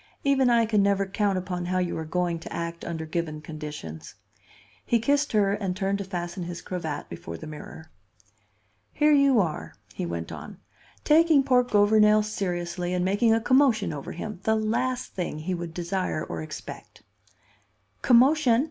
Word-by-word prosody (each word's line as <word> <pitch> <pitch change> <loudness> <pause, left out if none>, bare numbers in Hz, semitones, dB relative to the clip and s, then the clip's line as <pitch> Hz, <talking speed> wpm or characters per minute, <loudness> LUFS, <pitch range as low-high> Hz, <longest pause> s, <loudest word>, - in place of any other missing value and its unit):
"Even 270 -2 +3
I 235 -1 +4
can 215 -2 +2
never 200 0 +2
count 195 0 0
upon 180 -1 -3
how 185 +1 0
you 180 -1 -1
are 160 - -4
going 175 +1 -1
to - - -10
act 170 0 -5
under 160 -2 -4
given 155 -1 -3
conditions." 150 - -8 0.7
He 235 - +2
kissed 285 +5 +1
her 200 -2 +3
and 195 -3 -3
turned 200 0 -1
to - - -2
fasten 175 -1 -5
his 170 0 -6
cravat 160 -5 -4
before 85 0 -8
the - - -9
mirror. 155 +1 -10 1.0
"Here 300 +1 +3
you 280 -4 +5
are," 165 -6 -2 0.2
he 90 - -4
went 85 -1 -5
on, - - -9 0.5
"taking 310 -2 +5
poor 255 -2 +4
Gouvernail 210 -2 +4
seriously 180 -3 -3
and 180 0 0
making 205 +5 +2
a 225 - +4
commotion 240 - +3
over 140 -2 -6
him, 200 +3 -6
the 220 +2 +2
last 235 +4 -1
thing 180 -4 -3
he 165 +5 -3
would 170 -1 -5
desire 175 -1 -2
or 80 -1 -5
expect." 80 - -9 1.0
"Commotion!" 255 0 +5
190 Hz, 165 wpm, -26 LUFS, 170-225 Hz, 1.0 s, you